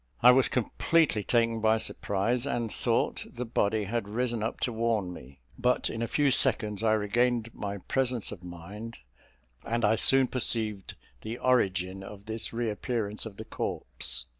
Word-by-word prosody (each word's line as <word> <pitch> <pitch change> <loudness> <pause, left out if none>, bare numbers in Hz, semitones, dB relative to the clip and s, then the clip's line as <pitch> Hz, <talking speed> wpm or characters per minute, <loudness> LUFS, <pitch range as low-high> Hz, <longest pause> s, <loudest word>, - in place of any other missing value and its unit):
I 125 - +10
was 130 +1 +4
completely 125 0 +1
taken 115 0 +2
by 110 0 +4
surprise, 110 +3 -1
and 120 -5 -2
thought - - 0
the 125 +1 -5
body 110 -2 +1
had 110 +1 -2
risen 120 +1 -1
up 110 - -3
to 120 - 0
warn 110 -5 0
me; 65 -4 -13 0.2
but 125 0 +1
in 115 - -4
a 115 - 0
few 140 +4 +2
seconds 105 -4 +2
I 110 -1 +3
regained 115 +2 +1
my 100 0 -4
presence 125 +2 -1
of 95 -4 -9
mind, 100 +7 -8 0.7
and 115 -1 0
I 110 +2 +3
soon 135 +3 +5
perceived 110 -6 -1 0.3
the 110 +2 -5
origin 95 -7 +1
of 100 +1 -10
this 110 +1 -3
reappearance 115 -1 -2
of 100 -3 -11
the 110 - -7
corpse. 60 - -3
110 Hz, 165 wpm, -29 LUFS, 105-120 Hz, 0.7 s, I